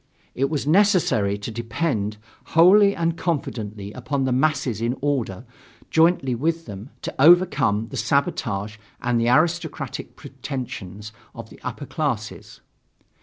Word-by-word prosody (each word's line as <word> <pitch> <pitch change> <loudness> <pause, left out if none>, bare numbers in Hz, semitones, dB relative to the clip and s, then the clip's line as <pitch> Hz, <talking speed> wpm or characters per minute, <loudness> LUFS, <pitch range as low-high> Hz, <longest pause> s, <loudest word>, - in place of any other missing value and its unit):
It 135 +2 0
was 150 -3 -2
necessary 160 - +3
to 100 +3 -6
depend 115 -2 -2 0.4
wholly 200 +4 +7
and 165 0 0
confidently 110 - -3
upon 135 +3 -2
the 130 - 0
masses 135 -4 0
in 120 +2 -1
order, 130 -7 -2 0.5
jointly 160 -5 +3
with 165 +7 -1
them, 105 +3 -9
to - - -4
overcome 140 - +4
the - - -6
sabotage 110 - -1 0.2
and 120 -1 0
the 115 - +2
aristocratic 160 +4 0
pretensions 105 -7 -7 0.2
of - - -9
the - - -14
upper - - -6
classes. - - -4
130 Hz, 125 wpm, -23 LUFS, 110-165 Hz, 0.5 s, wholly